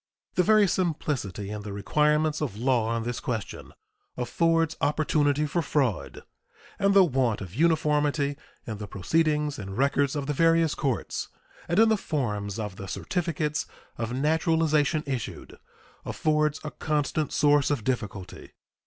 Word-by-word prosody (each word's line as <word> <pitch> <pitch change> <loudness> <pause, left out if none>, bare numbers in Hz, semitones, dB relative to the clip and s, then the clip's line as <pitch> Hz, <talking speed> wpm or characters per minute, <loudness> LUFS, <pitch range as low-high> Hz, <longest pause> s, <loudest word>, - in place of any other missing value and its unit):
The - - +3
very 215 +2 +5
simplicity 145 - -2
in 105 0 -5
the 105 0 -7
requirements 150 +9 +1
of 125 -9 -3
law 120 -1 +1
on 115 0 -1
this 120 0 -3
question 115 -4 -5 0.5
affords 165 +6 +1
opportunity 150 0 +2
for 170 +4 0
fraud, 135 - -1 0.6
and 200 0 +3
the 195 - +8
want 130 - +1
of 95 -3 -8
uniformity 150 -1 +2 0.3
in 110 -3 -5
the 105 - -6
proceedings 150 - 0
and 95 0 -6
records 140 +1 +2
of 145 -2 -2
the 150 - -1
various 165 +1 +3
courts 135 -7 -2 0.4
and 170 - 0
in 225 +1 +6
the 220 - +3
forms 105 - -2
of 105 -4 -5
the 100 -2 -7
certificates 160 - -2 0.3
of 115 0 -2
naturalization 155 +1 +2
issued 130 -5 -5 0.4
affords 150 -1 0
a 150 - -5
constant 150 0 -1
source 145 -1 +3
of 145 -7 -1
difficulty. 105 -7 -4
145 Hz, 145 wpm, -27 LUFS, 115-155 Hz, 0.6 s, the